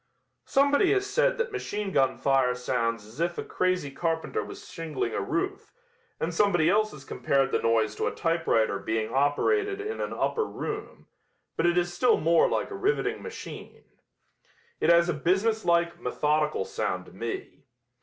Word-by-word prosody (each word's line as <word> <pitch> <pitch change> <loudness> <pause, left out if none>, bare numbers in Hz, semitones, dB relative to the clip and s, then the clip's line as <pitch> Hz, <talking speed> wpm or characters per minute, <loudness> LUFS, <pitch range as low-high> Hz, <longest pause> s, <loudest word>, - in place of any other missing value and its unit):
Somebody 285 +8 +4
has 395 -1 +1
said - - +1
that 470 0 -1
machine 205 -1 -3
gun 135 -7 +2
fire 135 -2 +2
sounds 115 -3 -1
as 110 +7 -14
if 170 +1 0
a - - -2
crazy 185 -6 -1
carpenter 165 +2 -2
was - - -10
shingling 150 -8 -4
a - - -1
roof, 155 +12 -3 0.5
and 165 +2 -2
somebody 175 -3 +3
else 215 +1 +2
has 135 -3 -12
compared 135 -1 0
the - - +1
noise 110 -2 +2
to - - 0
a - - 0
typewriter 115 -12 +1
being 110 +2 -2
operated 395 - +1
in 430 +2 -4
an - - -3
upper 450 -2 0
room, 425 0 -6 0.5
but 170 - +2
it 175 0 +2
is 175 0 +1
still 235 +8 +3
more 165 +1 +4
like - - -1
a - - -4
riveting 400 +3 0
machine. 455 -1 -9 1.0
It - - +2
has 170 0 +6
a 175 - +1
business 190 +8 +1
like, 170 0 +2
methodical 150 -7 0
sound 90 0 -3
to - - -15
me. 115 +5 -6
170 Hz, 170 wpm, -27 LUFS, 135-215 Hz, 1.0 s, has